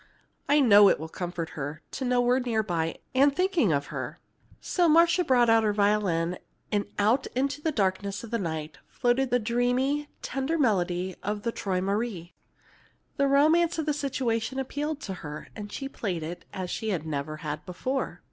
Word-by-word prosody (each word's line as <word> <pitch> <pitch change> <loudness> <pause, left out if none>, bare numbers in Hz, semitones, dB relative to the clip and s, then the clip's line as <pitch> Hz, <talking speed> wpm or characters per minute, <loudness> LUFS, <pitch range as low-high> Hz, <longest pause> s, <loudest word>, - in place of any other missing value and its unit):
I 290 +1 +5
know 205 -5 +8
it - - +2
will 160 - -5
comfort 175 -1 -4
her 145 +2 -6
to - - -4
know 250 0 +2
we're 245 +1 +3
near 230 -4 0
by 165 -5 -2 0.2
and 275 +2 +4
thinking 365 - +2
of 140 -1 +1
her." - - -5 0.4
So 350 -2 +1
Marcia 335 +3 +5
brought 245 -5 +4
her 225 -2 +4
violin, 200 -5 +1 0.3
and 205 -1 +1
out 220 +6 +2
into 275 +3 -1
the 320 - 0
darkness 200 -3 -1
of 230 - -9
the 230 - 0
night 160 -5 -4
floated 250 +1 +1
the 245 - +3
dreamy, 245 +5 0
tender 270 +5 -1
melody 185 - +1
of 205 +1 -3
the 230 - 0
"Träumerei." 195 -2 -2 0.9
The 280 - +3
romance 315 +5 +4
of 320 - -1
the 300 - +1
situation 265 -4 -1
appealed 290 +3 -3
to 195 - -5
her, 150 0 -7
and 205 -1 -7
she 270 - -4
played 190 - -4
it 170 +3 -7
as 185 -2 -5
she 215 -5 -1
never 155 -1 -4
had 150 0 -4
before. 260 +9 -3
225 Hz, 175 wpm, -27 LUFS, 180-270 Hz, 0.9 s, know